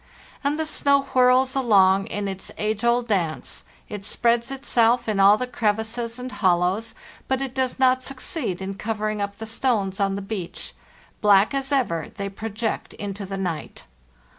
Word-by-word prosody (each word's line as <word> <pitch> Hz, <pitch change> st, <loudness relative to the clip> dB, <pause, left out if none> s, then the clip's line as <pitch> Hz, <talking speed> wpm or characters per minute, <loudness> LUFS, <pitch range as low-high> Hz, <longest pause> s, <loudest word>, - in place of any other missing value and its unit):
And 290 Hz, +2 st, 0 dB
the 315 Hz, -, +1 dB
snow 280 Hz, -2 st, +2 dB
whirls 255 Hz, +1 st, +4 dB
along 195 Hz, -7 st, +4 dB
in 205 Hz, -1 st, -3 dB
its 190 Hz, -1 st, -5 dB
age 215 Hz, +1 st, -2 dB
old 235 Hz, 0 st, +2 dB
dance; 175 Hz, -7 st, -2 dB, 0.2 s
it 205 Hz, -2 st, -7 dB
spreads 235 Hz, +3 st, +1 dB
itself 240 Hz, -3 st, +2 dB
in 210 Hz, -2 st, 0 dB
all 200 Hz, +2 st, +7 dB
the 250 Hz, -, -2 dB
crevices 230 Hz, 0 st, -2 dB
and 250 Hz, 0 st, -6 dB
hollows, 185 Hz, +4 st, +1 dB, 0.3 s
but 265 Hz, -1 st, +1 dB
it 270 Hz, -2 st, -4 dB
does 260 Hz, -1 st, -1 dB
not 260 Hz, -1 st, +3 dB
succeed 260 Hz, -, -2 dB
in 195 Hz, +1 st, -4 dB
covering 215 Hz, 0 st, -3 dB
up 200 Hz, 0 st, -3 dB
the 220 Hz, -, -6 dB
stones 220 Hz, -4 st, 0 dB
on 195 Hz, -1 st, +1 dB
the 200 Hz, -, -4 dB
beach; 195 Hz, -4 st, -6 dB, 0.5 s
black 205 Hz, +1 st, +5 dB
as 270 Hz, 0 st, -2 dB
ever, 200 Hz, -, 0 dB
they 200 Hz, 0 st, -3 dB
project 220 Hz, +2 st, -4 dB
into 200 Hz, -1 st, -6 dB
the 195 Hz, 0 st, -4 dB
night. 175 Hz, -5 st, -4 dB
220 Hz, 165 wpm, -24 LUFS, 195-250 Hz, 0.5 s, all